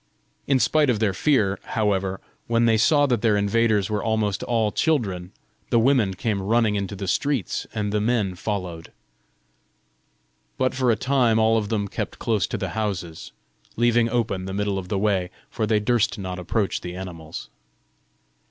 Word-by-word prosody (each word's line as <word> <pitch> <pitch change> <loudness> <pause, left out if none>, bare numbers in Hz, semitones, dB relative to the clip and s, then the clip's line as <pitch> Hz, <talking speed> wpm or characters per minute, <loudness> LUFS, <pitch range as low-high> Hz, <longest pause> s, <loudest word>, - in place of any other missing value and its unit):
In 140 - +4
spite 150 +2 +3
of 120 - +2
their 105 -2 +1
fear, 100 -5 +1
however, 95 -3 -1 0.3
when 115 0 +2
they 115 -1 +4
saw 145 +6 +4
that 120 -6 0
their 110 -3 +3
invaders 105 0 +2
were 105 -2 -2
almost 110 -3 0
all 115 -3 0
children, 100 - 0 0.4
the - - +3
women 115 -5 +3
came 100 0 -1
running 110 +2 +2
into 100 0 -3
the 95 0 -5
streets, 130 - -1
and 105 -2 -1
the 105 - +1
men 110 -4 +1
followed. 90 -4 -5 1.7
But 130 0 +1
for 130 -1 +1
a 115 - +4
time 125 -3 +2
all 110 0 +4
of 105 -2 0
them 105 -3 -1
kept - - -5
close 110 -5 0
to - - -3
the - - -3
houses, 95 -7 -4 0.4
leaving 120 0 +3
open 110 -6 -1
the 95 0 -5
middle 100 -1 -1
of 90 - -8
the 100 - -1
way, 95 -3 +1 0.2
for 110 - -1
they 110 -1 +3
durst 115 +1 +1
not 95 -2 -5
approach 100 +3 -1
the 90 0 -6
animals. 85 -4 -8
105 Hz, 170 wpm, -24 LUFS, 95-115 Hz, 1.7 s, In